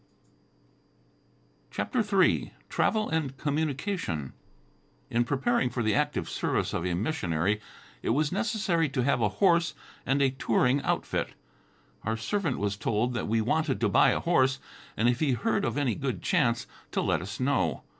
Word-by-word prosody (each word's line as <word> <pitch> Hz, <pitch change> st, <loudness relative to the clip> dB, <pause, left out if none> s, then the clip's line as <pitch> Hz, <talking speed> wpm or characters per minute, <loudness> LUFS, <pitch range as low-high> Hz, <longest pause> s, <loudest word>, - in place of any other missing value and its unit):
CHAPTER 100 Hz, -, -2 dB
III 200 Hz, -4 st, +2 dB, 0.2 s
TRAVEL 215 Hz, -1 st, +1 dB
AND 150 Hz, -5 st, -1 dB
COMMUNICATION 145 Hz, -, -2 dB, 0.8 s
In 120 Hz, +1 st, +3 dB
preparing 140 Hz, -, +1 dB
for 120 Hz, 0 st, -2 dB
the 110 Hz, -1 st, +2 dB
active -, -, 0 dB
service -, -, -1 dB
of -, -, -1 dB
a 90 Hz, -, 0 dB
missionary, 100 Hz, -, 0 dB, 0.4 s
it -, -, -2 dB
was 145 Hz, +5 st, +2 dB
necessary 195 Hz, -6 st, 0 dB
to 130 Hz, -2 st, -1 dB
have 130 Hz, -2 st, +2 dB
a 105 Hz, -, +3 dB
horse 170 Hz, -, +2 dB, 0.3 s
and 135 Hz, +2 st, +1 dB
a 135 Hz, -, +3 dB
touring 130 Hz, +1 st, +2 dB
outfit. -, -, -1 dB, 0.7 s
Our 110 Hz, +1 st, -2 dB
servant 200 Hz, -, -1 dB
was 100 Hz, -1 st, -1 dB
told 110 Hz, +4 st, 0 dB
that 120 Hz, -, -2 dB
we 110 Hz, +1 st, +2 dB
wanted 135 Hz, +5 st, 0 dB
to 105 Hz, -, +3 dB
buy -, -, +5 dB
a -, -, +1 dB
horse, 130 Hz, -6 st, +2 dB, 0.4 s
and 115 Hz, -, +3 dB
if 120 Hz, 0 st, +2 dB
he 145 Hz, -4 st, +2 dB
heard 200 Hz, -, 0 dB
of -, -, -1 dB
any 140 Hz, -5 st, +1 dB
good 125 Hz, -6 st, -3 dB
chance, -, -, +2 dB, 0.3 s
to -, -, +1 dB
let -, -, +1 dB
us 100 Hz, +2 st, -7 dB
know. 125 Hz, -, 0 dB
130 Hz, 160 wpm, -28 LUFS, 110-160 Hz, 0.8 s, buy